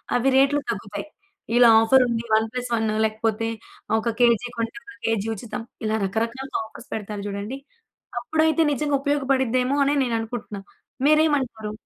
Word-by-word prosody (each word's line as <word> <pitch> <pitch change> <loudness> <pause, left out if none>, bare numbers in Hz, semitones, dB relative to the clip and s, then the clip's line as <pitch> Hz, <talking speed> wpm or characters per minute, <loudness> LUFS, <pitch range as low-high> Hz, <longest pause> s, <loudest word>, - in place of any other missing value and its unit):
అవి 245 +2 +3
రేట్లు 275 +2 +4
తగ్గుతాయి. 205 -1 -6 0.5
ఇలా 245 -1 +8
ఆఫరుంది 235 -1 +3
వన్ 220 +1 +3
ప్లస్ 250 -1 -4
వన్ 220 -1 0 0.2
లేకపోతే 220 +1 -1 0.5
ఒక 230 +1 -1
కేజీ 240 0 +4
కొంటే, 230 0 -2
ఒక 405 - -12
కేజీ 225 -2 0
ఉచితం. 225 +2 -6 0.2
ఇలా 215 0 0
రకరకాలుగా 230 +7 -2
ఆఫర్స్ 220 - -13
పెడతారు 210 -1 -5
చూడండి. 205 +6 -5 0.6
అప్పుడైతే 315 +5 +1
నిజంగా 290 +1 0
ఉపయోగపడుద్దేమో 265 -2 +1
అని 290 +1 +2
నేను 240 -3 -1
అనుకుంటున్నాను. 220 -3 -6 0.4
మీరేమంటారు? 275 -9 +2
235 Hz, 135 wpm, -23 LUFS, 220-270 Hz, 0.6 s, ఇలా